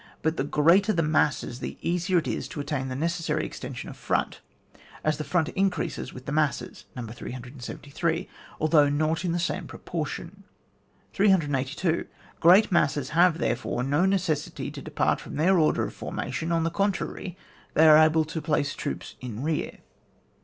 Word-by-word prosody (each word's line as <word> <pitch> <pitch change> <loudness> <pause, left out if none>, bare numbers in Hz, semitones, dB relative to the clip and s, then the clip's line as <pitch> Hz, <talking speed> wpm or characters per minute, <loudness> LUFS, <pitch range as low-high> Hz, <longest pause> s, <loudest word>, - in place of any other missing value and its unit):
But 160 0 +1
the 135 - -1
greater 170 +9 +4
the 165 - +1
masses 150 -5 +1
the - - -5
easier 180 +2 0
it 165 - 0
is - - -2
to - - -7
attain 145 -2 -2
the 130 - -4
necessary 165 +4 -1
exten - - -7
sion - - -6
of - - -8
front, - - -1 0.6
as 155 -1 +1
the - - -1
front 160 +2 +1
increases 195 -1 -1
with 130 +1 -11
the - - -4
masses 150 -1 -1
(No. 125 -2 -5
373), 135 - -4 0.3
although 150 -2 +4
not 155 +3 0
in 175 - 0
the 170 - 0
same 170 - -2
proportion, 170 +4 -6 0.7
382. 160 -4 +1 0.3
Qreat 185 +6 +6
masses 145 -6 +2
have, 170 +1 +4
therefore, 120 -2 -1
no 145 +7 +2
necessity 180 -6 -1
to - - -8
depart - - 0
from - - -8
their 175 +5 +4
order 155 - +3
of - - -4
formation, 165 +1 -4
on 165 -1 +2
the 165 - 0
contrary, 195 -1 -2 0.4
they 160 +1 +6
are 155 -1 +9
able 155 0 +4
to 160 +1 -5
place 145 -2 0
troops 145 - -5
in 120 -1 -5
rear. 155 0 -2
155 Hz, 165 wpm, -26 LUFS, 145-175 Hz, 0.7 s, are